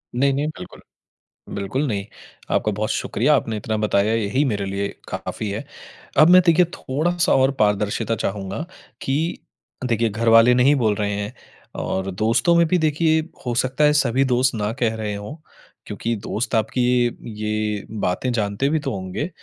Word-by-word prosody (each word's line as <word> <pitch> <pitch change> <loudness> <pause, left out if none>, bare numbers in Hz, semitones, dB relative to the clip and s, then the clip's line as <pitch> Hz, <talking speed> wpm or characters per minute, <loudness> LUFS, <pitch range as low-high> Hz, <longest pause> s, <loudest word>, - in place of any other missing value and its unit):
नहीं-नहीं, 140 +3 +1
बिल्कुल। 90 - -10 0.7
बिल्कुल, 100 +9 -2
नहीं। 100 -5 -2 0.5
आपका 105 - +1
बहुत 105 +1 -2
शुक्रिया, 145 +6 +1
आपने 115 -4 -1
इतना 110 +1 -2
बताया 105 0 +1
यही 115 +5 +1
मेरे 105 -6 -1
लिए 100 +1 -2 0.2
काफ़ी 110 - -4
है। 100 - -4 0.5
अब 155 +2 +7
मैं 180 +1 +8
देखिए 175 +1 +5
थोड़ा-सा 170 +5 0
और 135 +1 +4
पारदर्शिता 105 +2 +1
चाहूँगा 100 - -4 0.4
कि 135 +1 0 0.7
देखिए 115 -2 +1
घरवाले 115 +2 +5
नहीं 130 +4 +4
बोल 110 -6 +1
रहे 105 0 -1
हैं 100 +3 -4 0.5
और 95 0 -2
दोस्तों 115 - +2
में 170 0 +5
भी 180 - +2
देखिए 160 0 +2 0.2
हो 120 - -1
सकता 130 +3 0
है 150 0 +5
सभी 135 -3 +2
दोस्त 130 0 +2
ना 105 -1 -1
कह 115 -2 +1
रहे 110 -2 -3
हों। 105 +8 -7 0.5
क्योंकि 115 0 -3
दोस्त 110 +3 -3
आपकी 110 +3 0 0.3
ये 110 -2 -6
ये 105 -1 -2
बातें 100 +7 -1
जानते 105 +4 0
भी 155 +1 +1
तो 140 -2 -3
होंगे, 95 - -4
115 Hz, 165 wpm, -22 LUFS, 105-135 Hz, 0.7 s, मैं